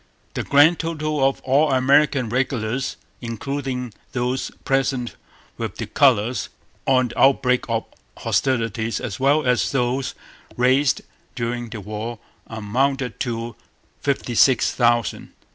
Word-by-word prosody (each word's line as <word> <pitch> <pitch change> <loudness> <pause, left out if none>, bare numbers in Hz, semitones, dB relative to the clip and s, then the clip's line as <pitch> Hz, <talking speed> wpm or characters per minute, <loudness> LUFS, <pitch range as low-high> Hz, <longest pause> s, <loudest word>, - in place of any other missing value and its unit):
The - - -2
grand 145 +4 +5
total 155 -3 -1
of 135 0 +1
all 140 +3 +3
American 135 0 +3
regulars, 125 0 -1 0.2
including 125 0 -4 0.2
those 125 +1 -1 0.2
present 135 -3 0 0.4
with - - -4
the - - -4
colours 120 -4 +2 0.4
on 130 -2 +3
the - - -7
outbreak 125 -2 +4
of 115 -1 -1 0.3
hostilities 115 -3 0
as 105 -1 -5
well 145 +3 +3
as 125 -1 +2
those 130 0 -1 0.4
raised 130 +3 +3 0.3
during 120 0 -3
the 110 -2 -7
war, 110 +3 -5 0.3
amounted 125 +3 -1
to 115 -1 -3 0.4
fifty 140 -3 -1
six 125 +1 +4
thousand. 120 -2 0
125 Hz, 120 wpm, -22 LUFS, 115-135 Hz, 0.4 s, grand